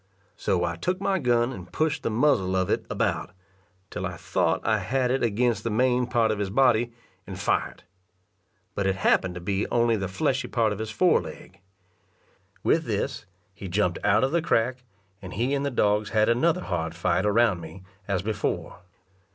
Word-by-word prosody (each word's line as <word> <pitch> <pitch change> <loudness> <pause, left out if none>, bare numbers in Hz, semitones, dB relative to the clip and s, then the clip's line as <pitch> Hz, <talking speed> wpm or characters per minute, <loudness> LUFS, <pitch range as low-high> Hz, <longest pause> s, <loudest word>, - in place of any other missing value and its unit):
So 90 -2 0
I 85 -1 -2
took 180 - -1
my 195 -1 0
gun 120 -2 +1
and 90 -6 -10
pushed 155 -1 0
the - - -1
muzzle 110 -6 +2
of 95 -1 0
it - - -1
about, - - -1 0.6
till - - -5
I - - -7
thought - - 0
I - - +2
had 130 -1 0
it 135 - 0
against 115 -1 +1
the 115 - -1
main 125 +2 +2
part 120 -3 +2
of 105 - -2
his 100 -2 -1
body, 120 0 +3 0.4
and - - -7
fired; - - -1 0.9
but 100 -1 -1
it 95 - +1
happened 95 -1 +2
to - - -5
be 95 +3 -1
only 115 -1 +2
the 95 -3 -2
fleshy 130 - -1
part 115 -4 +1
of 105 - -8
his 110 0 -4
foreleg. 175 +11 0 1.0
With - - +2
this, - - -3 0.3
he 95 0 -8
jumped 90 -1 0
out 105 +3 +3
of 135 - +1
the 170 +1 +2
crack, 125 -5 +1 0.4
and 90 -2 -8
he 120 +7 0
and 140 0 0
the 140 - 0
dogs 105 -4 +1
had 110 0 +2
another 165 +9 +2
hard 85 - -3
fight 90 +1 +1
around 105 -3 +2
me, 80 +4 -10 0.2
as 95 -2 -1
before. 105 -1 -3
110 Hz, 185 wpm, -26 LUFS, 95-125 Hz, 1.0 s, body